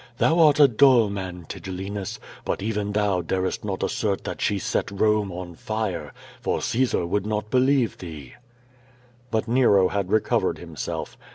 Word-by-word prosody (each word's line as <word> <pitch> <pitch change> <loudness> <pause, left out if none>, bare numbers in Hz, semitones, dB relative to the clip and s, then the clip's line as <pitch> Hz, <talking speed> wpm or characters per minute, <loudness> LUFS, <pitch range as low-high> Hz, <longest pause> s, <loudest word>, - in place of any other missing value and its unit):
"Thou 165 +6 +3
art 150 -3 +6
a 145 - +9
dull 120 -3 +5
man, 90 -3 -6
Tigellinus, 95 +1 -5 0.3
but - - -2
even 105 -1 -2
thou 100 -3 +1
darest 95 +2 -2
not 100 -2 -3
assert 100 -3 -1
that - - -5
she 100 - +1
set - - -1
Rome 105 0 +1
on 90 0 -7
fire, 95 -5 -3 0.3
for - - 0
Caesar 120 -7 0
would 100 +4 -1
not 105 0 -2
believe 130 -2 +2
thee." 75 -7 -9 1.0
Kut 110 0 0
Nero 115 -6 +4
had 100 -2 -2
recovered 110 -1 +1
himself. - - -6
105 Hz, 155 wpm, -24 LUFS, 95-110 Hz, 1.0 s, a